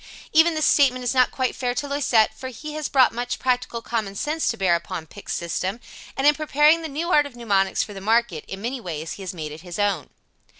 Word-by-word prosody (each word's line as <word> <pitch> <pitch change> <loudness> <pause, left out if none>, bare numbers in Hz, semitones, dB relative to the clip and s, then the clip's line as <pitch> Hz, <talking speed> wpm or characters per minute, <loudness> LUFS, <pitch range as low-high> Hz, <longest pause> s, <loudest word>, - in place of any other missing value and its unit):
Even 320 +1 +5
this 310 - +1
statement 255 -3 +4
is 245 - 0
not 255 -2 +4
quite 260 -1 -2
fair 245 -1 -2
to 285 - -2
Loisette, 270 -6 +2
for 260 - -8
he 295 +5 -8
has 305 -1 -3
brought 260 -4 +4
much 245 +1 -3
practical 250 -2 -1
common 215 -4 -3
sense 305 +9 -1
to 230 - 0
bear 190 -3 +2
upon 170 0 -3
Pick's 200 +5 -7
system, 185 +5 -3 0.4
and, 270 - 0
in 295 - +7
preparing 305 +2 +3
the 320 - -4
new 320 +4 -3
art 295 -3 +4
of 265 - -15
mnemonics 200 -5 +1
for 210 - -9
the 195 - -8
market, 220 -6 +1
in 195 +1 -7
many 250 +2 -3
ways 160 -4 -5
he - - -10
has 185 -1 -6
made 155 -3 -5
it 155 +2 -9
his 175 -1 -8
own. 200 -8 0
240 Hz, 240 wpm, -23 LUFS, 195-285 Hz, 0.4 s, in